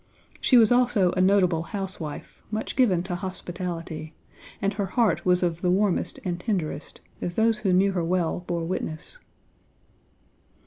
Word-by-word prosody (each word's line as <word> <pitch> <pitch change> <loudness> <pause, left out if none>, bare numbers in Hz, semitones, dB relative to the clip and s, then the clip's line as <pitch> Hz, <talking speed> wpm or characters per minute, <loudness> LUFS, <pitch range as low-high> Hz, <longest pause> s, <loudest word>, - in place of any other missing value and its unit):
She 255 - +4
was 230 0 +6
also 245 -7 +3
a 185 - 0
notable 185 -3 +3
housewife, 185 -5 -5
much 215 +1 -3
given 195 -10 +3
to 185 -1 -4
hospitality; 175 -3 -5 0.4
and 200 +1 0
her 200 -1 -2
heart 185 -6 +1
was 180 0 +3
of 170 -1 -1
the 180 - +1
warmest 190 0 +1
and 175 -1 -2
tenderest, 175 -8 -3 0.2
as 175 - -3
those 225 -1 +2
who 200 -3 +1
knew 190 +2 +4
her 180 -3 -1
well 175 0 0
bore 170 -1 -2
witness. 165 - -5
185 Hz, 150 wpm, -25 LUFS, 175-205 Hz, 0.4 s, was